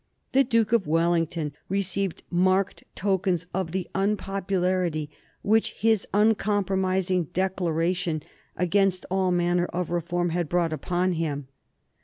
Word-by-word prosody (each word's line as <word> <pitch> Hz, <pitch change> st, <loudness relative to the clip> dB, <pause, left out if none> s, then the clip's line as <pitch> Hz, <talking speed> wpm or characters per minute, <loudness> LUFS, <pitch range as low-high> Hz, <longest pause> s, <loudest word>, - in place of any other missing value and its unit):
The 270 Hz, +1 st, +5 dB
Duke 230 Hz, -3 st, +1 dB
of 225 Hz, -7 st, +3 dB
Wellington 165 Hz, -1 st, +1 dB, 0.2 s
received 195 Hz, -1 st, -1 dB
marked 185 Hz, +2 st, +2 dB
tokens 190 Hz, -3 st, 0 dB
of 185 Hz, -3 st, -2 dB
the 185 Hz, 0 st, -2 dB
unpopularity 185 Hz, -5 st, 0 dB, 0.3 s
which 220 Hz, +2 st, +2 dB
his 220 Hz, -2 st, +1 dB
uncompromising 190 Hz, -4 st, +1 dB
declaration 175 Hz, -3 st, 0 dB, 0.3 s
against 185 Hz, +1 st, +2 dB
all 190 Hz, -1 st, +2 dB
manner 175 Hz, 0 st, +2 dB
of 175 Hz, -1 st, -3 dB
reform 175 Hz, +1 st, 0 dB
had 170 Hz, -2 st, -1 dB
brought 170 Hz, -2 st, +1 dB
upon 180 Hz, +3 st, 0 dB
him. 145 Hz, -5 st, -3 dB
180 Hz, 115 wpm, -26 LUFS, 170-195 Hz, 0.3 s, The